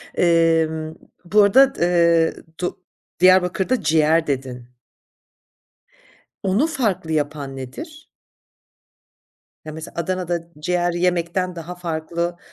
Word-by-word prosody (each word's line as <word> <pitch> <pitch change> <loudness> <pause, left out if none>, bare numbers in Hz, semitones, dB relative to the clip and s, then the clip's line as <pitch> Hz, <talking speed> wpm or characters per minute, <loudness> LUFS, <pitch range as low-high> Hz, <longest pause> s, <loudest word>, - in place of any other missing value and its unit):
Emm, 165 -2 +2 0.3
bu 210 +5 +4
arada 265 +7 +5
d - - -11
eee, 170 -2 +3 0.3
do 180 - -3 0.4
Diyarbakır'da 185 +5 +3
ciğer 160 0 +2
dedin. 130 -3 -4 1.8
Onu 200 +10 +2
farklı 215 - -2
yapan 145 -3 -2
nedir? 305 - -9 1.6
Ya, 155 - -6
mesela, 160 +1 -9
Adana'da 175 -1 -2
ciğer 175 +2 0
yemekten 180 +1 -1
daha 170 +1 -7
farklı 170 0 -3
170 Hz, 95 wpm, -21 LUFS, 160-185 Hz, 1.8 s, arada